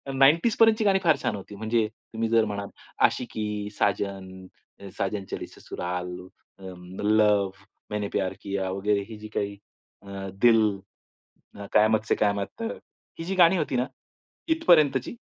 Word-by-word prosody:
90s 155 - +4
पर्यंतची 225 -1 +5
गाणी 195 -1 +4
फार 160 -3 +5
छान 105 - 0
होती 100 +1 -9
म्हणजे 110 +1 0 0.3
तुम्ही 115 0 -1
जर 115 -1 +4
म्हणाल 100 -1 -4 0.4
आशिकी, 105 -4 -4
साजन, 100 -1 0 0.7
साजन 100 0 -2
चली - - -4
ससुराल, 90 0 -5 0.9
लव्ह, 105 -2 +3 0.4
मैंने 105 -1 -2
प्यार 95 -1 0
किया, 100 -1 -2
वगैरे 100 +1 0
ही 110 - -8
जी 110 - -8
काही 100 0 -2 0.4
अ, 100 -1 -7
दिल, 115 -2 +6 1.1
कयामत 110 0 +4
से - - +3
कयामत 100 -1 0
तक, 225 - -3 0.4
ही 165 - -3
जी 190 +2 -2
गाणी 180 +1 +6
होती 150 -5 -1
ना, 125 - +1 0.6
इथपर्यंतची, 165 - +3
105 Hz, 135 wpm, -26 LUFS, 100-135 Hz, 1.1 s, दिल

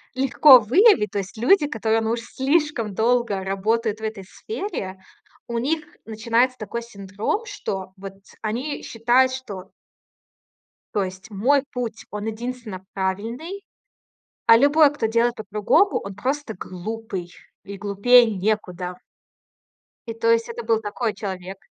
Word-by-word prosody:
легко 270 0 +7
выявить. 245 - +4
То 205 - -4
есть 200 +3 -7
люди, 295 - +4
которые, 225 -4 0
ну, 220 0 -1
уж 235 0 -1
слишком 265 -4 0
долго 230 -3 +1
работают 215 +3 -1
в 220 - -12
этой 215 -3 -4
сфере, 205 - -6 0.5
у 235 - -2
них 310 +6 -1 0.2
начинается 230 +3 +1
такой 235 +1 -5
синдром, 205 - -4
что 195 - -5
вот 195 0 -8 0.3
они 245 +7 -3
считают, 245 +3 +2
что 210 -8 -8 1.2
То 205 - +1
есть 185 +4 -9
мой 255 +8 +2
путь, 235 -3 -5
он 210 +1 -5
единственно 225 -3 -6
правильный. 225 - -3 0.8
А 230 - +8
любой, 290 +3 +5
кто 290 -6 -1
делает 235 +2 +1
по-другому, 215 - +2
он 200 0 -7
просто 260 +3 -3
глупый. 185 0 -6 0.3
И 200 0 -8
глупее 210 +5 +5
некуда. 185 -4 -2 1.1
И 230 - -4
то 230 0 +1
есть 230 0 +2
это 235 0 -6
был 225 -1 +2
такой 220 +1 -2
человек. 190 -1 -6
225 Hz, 135 wpm, -23 LUFS, 200-250 Hz, 1.2 s, А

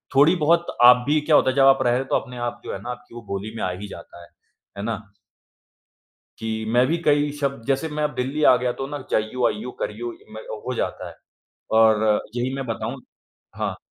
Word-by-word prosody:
थोड़ी 150 +6 +6
बहुत 170 +2 +3 0.2
आप 125 0 +8
भी 155 +1 +3
क्या 150 0 +3
होता - - +5
है 130 - -1
जब 135 -1 +5
आप 135 0 +6
रह 120 - +2
रहे 120 - +2
हो, 135 - -3
तो - - 0
अपने 125 -1 -3
आप 120 0 -4
जो - - -4
है - - -5
ना 120 - -7
आपकी 125 -1 -11
वो 120 - -7
बोली 100 +3 -5
में - - -3
आ 90 - 0
ही 100 +3 -7
जाता 85 -2 -11
है, - - -15 0.5
है 100 - -4
ना? 115 +1 -1 1.5
कि 110 0 -3
मैं 125 +1 +5
भी 165 +5 +1
कई 145 -1 +3
शब्द 140 -4 -2
जैसे 135 +3 0
मैं 150 0 -2
अब 150 - -2
दिल्ली 135 +4 -2
आ 125 - +5
गया 125 0 -1
तो 135 - -2
ना 145 +1 -5
जाइयो, 115 +3 +1
आइयो, 215 - -5
करियो 430 -7 -4 0.4
हो - - -6
में - - -3
जाता - - -3
है। - - -12 0.7
और 110 -1 +4
यही 125 +2 -1
मैं 135 -1 -4
बताऊँ 115 - -4 0.6
हाँ। - - -2
125 Hz, 230 wpm, -23 LUFS, 115-145 Hz, 1.5 s, आप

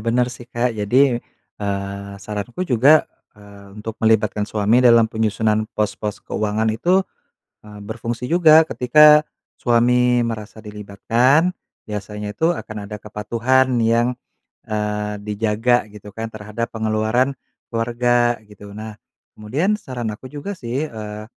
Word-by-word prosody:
bener 120 +2 +1
sih, 120 -1 -11
Kak. 120 0 -1
Jadi, 120 +4 +2 0.4
eee, 100 0 -4
saranku 105 - -4
juga, 140 +2 +5 0.3
eee, 100 -1 -15
untuk 110 +1 -6
melibatkan 110 -2 +2
suami 110 +3 +2
dalam 115 -2 +6
penyusunan 110 0 0
pos-pos 105 -1 -2
keuangan 110 +1 -1
itu, 180 - +2 0.6
eee, 105 -1 -12
berfungsi 115 +3 -5
juga. 160 -2 +6
Ketika 150 +4 +6 0.3
suami 125 +1 +3
merasa 110 -2 -4
dilibatkan, 115 - +1 0.4
biasanya 105 0 -6
itu 165 +2 +2
akan 110 -9 -8
ada 105 +1 -7
kepatuhan 120 +6 0
yang, 115 +1 +2 0.6
eee, 105 -1 -2
dijaga 110 +3 +1
gitu 105 -1 -12
kan 115 +2 -5
terhadap 110 +2 -5
pengeluaran 110 +4 0 0.4
keluarga 120 +1 +1
gitu. 105 -1 -13
Nah, 110 0 -8 0.3
kemudian 155 - -1
saran 120 -4 -5
aku 125 +5 -10
juga 145 +8 -6
sih, 135 -4 -3
eee, 105 -1 -7
110 Hz, 125 wpm, -20 LUFS, 105-125 Hz, 0.6 s, dalam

